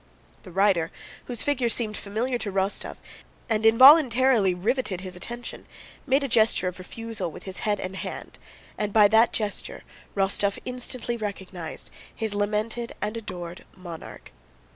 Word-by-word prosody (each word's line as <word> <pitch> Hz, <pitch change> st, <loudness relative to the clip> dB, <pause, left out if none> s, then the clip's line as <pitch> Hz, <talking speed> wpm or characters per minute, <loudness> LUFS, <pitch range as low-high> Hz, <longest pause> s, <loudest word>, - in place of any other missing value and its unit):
The 185 Hz, -, -12 dB
rider, 185 Hz, -3 st, +2 dB, 0.4 s
whose 240 Hz, -3 st, -1 dB
figure 265 Hz, -5 st, +1 dB
seemed 220 Hz, -2 st, 0 dB
familiar 235 Hz, +6 st, -2 dB
to 215 Hz, -3 st, -2 dB
Rostóv 195 Hz, +1 st, -1 dB, 0.5 s
and 220 Hz, -1 st, +2 dB
involuntarily 255 Hz, -, +7 dB
riveted 205 Hz, -1 st, -1 dB
his 185 Hz, -1 st, -6 dB
attention, 240 Hz, +6 st, -6 dB, 0.4 s
made 270 Hz, +1 st, +3 dB
a -, -, 0 dB
gesture 225 Hz, -5 st, +3 dB
of 180 Hz, +1 st, -5 dB
refusal 220 Hz, -1 st, -4 dB
with -, -, -11 dB
his 190 Hz, -1 st, -4 dB
head 205 Hz, -2 st, 0 dB
and 185 Hz, +1 st, -5 dB
hand -, -, -7 dB, 0.4 s
and 210 Hz, -1 st, -2 dB
by 210 Hz, -2 st, +7 dB
that 225 Hz, +2 st, +5 dB
gesture 220 Hz, -, -3 dB, 0.3 s
Rostóv 200 Hz, 0 st, +1 dB
instantly 250 Hz, -1 st, -2 dB
recognized 190 Hz, -6 st, -6 dB, 0.2 s
his 220 Hz, -2 st, -1 dB
lamented 215 Hz, +3 st, -1 dB
and 210 Hz, +2 st, -3 dB
adored 180 Hz, -6 st, -7 dB
monarch. 175 Hz, -3 st, -10 dB
215 Hz, 140 wpm, -26 LUFS, 190-240 Hz, 0.5 s, involuntarily